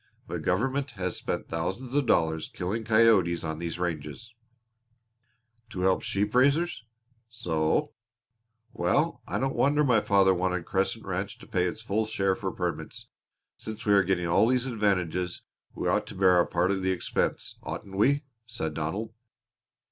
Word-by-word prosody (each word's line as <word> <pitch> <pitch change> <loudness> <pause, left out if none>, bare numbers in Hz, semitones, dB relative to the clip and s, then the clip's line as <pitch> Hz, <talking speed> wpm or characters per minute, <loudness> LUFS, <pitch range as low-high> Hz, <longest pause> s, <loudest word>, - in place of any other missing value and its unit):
The - - -4
government 135 +9 0
has 90 -1 -2
spent - - -3
thousands 95 +10 -3
of 145 -3 +1
dollars 80 -6 +2
killing 100 +6 -3
coyotes 110 -6 +4
on 80 -1 -4
these 85 -1 -4
ranges." 85 - -4 1.4
"To 95 -6 -5
help 95 0 +3
the - - -10
sheep 105 +2 -1
raisers?" 140 +2 +2 0.4
"So." 85 - 0 0.8
"Well, 150 - +1
I - - -2
don't 135 0 0
wonder 145 +2 +3
my 125 -6 +4
father 95 -2 +4
wanted 90 -1 -1
Crescent 100 +5 -1
Ranch 100 +4 -3
to - - -14
pay 90 -1 0
its 110 +5 -4
full 110 +1 0
share 95 -3 +1
for - - -3
permits. - - -5 0.5
Since 110 0 -7
we 105 - +4
are 100 - +6
getting 90 -1 0
all 90 +6 +4
these 125 0 +2
advantages, 90 -7 -1 0.3
we - - -2
ought - - +1
to - - -8
bear 95 -1 +4
our 85 - +3
part 90 +2 +1
of 95 -1 -1
the 95 - 0
expense, 95 - -2
oughtn't 95 -1 -7
we?" 140 +9 +3 0.2
said 80 -9 -4
Donald. 80 +9 -3
100 Hz, 165 wpm, -28 LUFS, 90-115 Hz, 1.4 s, are